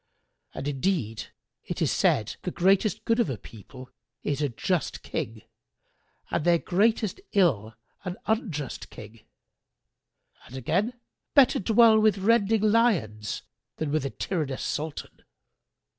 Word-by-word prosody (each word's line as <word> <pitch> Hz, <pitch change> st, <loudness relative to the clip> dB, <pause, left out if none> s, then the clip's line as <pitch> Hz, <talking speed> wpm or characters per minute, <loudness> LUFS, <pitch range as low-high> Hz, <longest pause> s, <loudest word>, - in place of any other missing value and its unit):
and 140 Hz, -, -4 dB
indeed 140 Hz, -, -1 dB, 0.4 s
it -, -, -5 dB
is -, -, +1 dB
said, 110 Hz, 0 st, +1 dB
'The -, -, -3 dB
greatest 195 Hz, +3 st, +2 dB
good 230 Hz, +1 st, +2 dB
of 235 Hz, -, +2 dB
a 130 Hz, -, -3 dB
people 115 Hz, +5 st, -13 dB, 0.3 s
is 145 Hz, 0 st, -1 dB
a 145 Hz, -, +1 dB
just 165 Hz, +7 st, -2 dB
King 110 Hz, 0 st, -5 dB, 0.9 s
and -, -, 0 dB
their 175 Hz, +1 st, +4 dB
greatest 215 Hz, -, +1 dB
ill 115 Hz, -, +2 dB, 0.3 s
an 180 Hz, -1 st, -5 dB
unjust 190 Hz, -, -2 dB
King'; 110 Hz, -1 st, -12 dB, 1.3 s
and 130 Hz, -, -9 dB
again, 195 Hz, -, -1 dB, 0.4 s
'Better 275 Hz, -4 st, +6 dB
dwell 220 Hz, +2 st, +5 dB
with 215 Hz, -2 st, +3 dB
rending 215 Hz, +1 st, +3 dB
lions 170 Hz, -, +1 dB, 0.3 s
than 155 Hz, -2 st, -3 dB
with 155 Hz, -2 st, +1 dB
a 135 Hz, -, -2 dB
tyrannous 150 Hz, -5 st, -3 dB
Sultan.' 155 Hz, 0 st, -5 dB
170 Hz, 130 wpm, -27 LUFS, 130-215 Hz, 1.3 s, Better